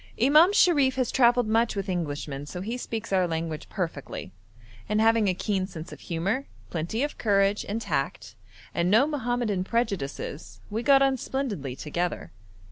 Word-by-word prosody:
Imam 300 - +6
Sharif 290 -10 +4
has 255 -2 0
travelled 245 -1 +4
much 225 +1 +2
with 200 0 -3
Englishmen, 145 -5 -3
so 180 +3 -6
he 225 +5 -3
speaks 225 -4 -5
our 185 -2 +3
language 160 -2 -4
perfectly, 165 - -5 0.6
and 210 0 +1
having 225 -1 +4
a 185 - +1
keen 190 -1 -1
sense 165 -3 -9
of - - -10
humour, 195 +11 -2 0.2
plenty 175 - -2
of 295 - -4
courage 200 -1 +2
and 215 +3 -1
tact, - - -3 0.4
and 170 +1 +1
no 225 +7 +5
Mohammedan 245 -9 -1
prejudices, 195 - -3
we 220 +2 -1
got 275 +1 +5
on 270 -1 +2
splendidly 210 - -3
together. 170 +6 -3
210 Hz, 160 wpm, -26 LUFS, 175-245 Hz, 0.6 s, Imam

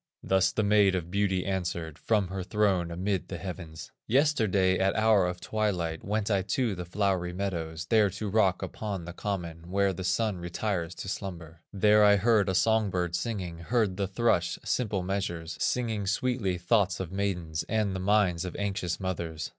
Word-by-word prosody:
Thus 95 -1 +3
the 110 - 0
Maid 100 -2 +4
of 85 -1 -4
Beauty 95 -2 +1
answered 85 -4 -3
From 105 -5 +1
her 95 0 -4
throne 95 -2 +1
amid 90 +1 -2
the - - -5
heavens: 85 -4 -7 0.2
"Yesterday 110 -9 +3
at 95 0 +2
hour 110 -4 +4
of 90 0 -4
twilight, 90 -8 -2
Went 105 +1 -1
I 100 -2 +3
to 110 +4 0
the 90 -1 -5
flowery 90 -1 0
meadows, 85 -4 -3
There 105 +1 +4
to 105 +3 -5
rock 100 -3 +2
upon 100 -5 -4
the 85 - -7
common, 85 -4 -5
Where 100 0 +2
the 95 - -6
Sun 95 +3 0
retires 85 0 -3
to - - -7
slumber; 85 -5 -6
There 105 +1 +4
I 105 0 +7
heard 105 -1 +3
a 95 - 0
song 110 +1 +3
bird 90 -2 -1
singing, 90 -3 -3
Heard 100 +1 0
the 100 -1 0
thrush 95 -4 +1
in - - -22
simple 105 -7 0
measures, 85 -3 -3
Singing 110 -5 -1
sweetly 105 -3 0
thoughts 90 +1 +1
of 95 -2 -4
maidens, 90 -5 -2
And 105 -3 0
the - - -3
minds 95 -3 +2
of 90 - -6
anxious 95 -4 -2
mothers. 85 -5 -4
95 Hz, 180 wpm, -28 LUFS, 90-105 Hz, 0.2 s, I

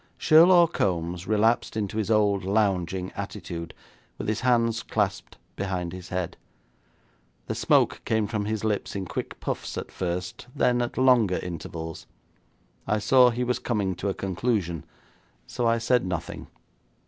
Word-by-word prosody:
Sherlaw 170 +2 +7
Kombs 90 - -2
relapsed 110 +2 +2
into 105 0 -2
his 110 -2 -1
old 105 -3 +2
lounging 95 -2 0
attitude, 85 -4 -6 0.5
with - - -5
his 110 - 0
hands 115 -2 +2
clasped 100 -3 -2 0.2
behind 90 -3 -3
his 90 0 -9
head. 90 -2 -3 1.1
The - - -3
smoke - - +2
came 110 -1 +1
from 105 -1 -2
his 110 0 -2
lips 105 -2 -1
in 95 -1 -3
quick - - -5
puffs - - -4
at - - -5
first, 90 +4 -4
then 120 0 +2
at 120 - -3
longer 120 -8 +4
intervals. 80 -2 -6 0.8
I 105 +2 +2
saw 125 +3 +5
he 120 +1 -2
was 125 0 0
coming 100 -6 -1
to 100 - -2
a 95 - -2
conclusion, 95 -4 -2 0.6
so 120 - -1
I 115 0 +3
said 120 +2 +2
nothing. 90 -2 -5
100 Hz, 150 wpm, -26 LUFS, 90-115 Hz, 1.1 s, Sherlaw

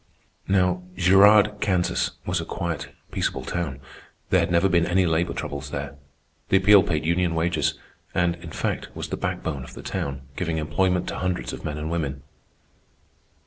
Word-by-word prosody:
Now 90 -2 +2
Girard, 100 +3 +6
Kansas, 90 -3 +1
was - - 0
a - - -4
quiet, 85 -3 -3 0.2
peaceable - - -2
town. 80 -6 -3 0.5
There 95 - +5
had 85 0 +1
never 85 +2 +3
been 85 -2 +2
any 95 +1 +3
labor 85 +1 +1
troubles 70 0 -5
there. 70 -1 -5 0.5
The 95 - +5
Appeal 100 +1 +7
paid 75 -4 -1
union 85 0 +1
wages; 80 -3 +1 0.4
and, 85 -1 +2
in 85 -1 -10
fact, - - -3
was - - -5
the - - -2
backbone 70 -5 -3
of 60 - -11
the - - -9
town, 70 -1 -3
giving 85 -1 -2
employment 90 +4 +1
to - - -4
hundreds 90 -1 -2
of - - -8
men 75 -1 -3
and 75 +2 -4
women. 70 -5 -3
85 Hz, 170 wpm, -24 LUFS, 75-90 Hz, 0.5 s, Appeal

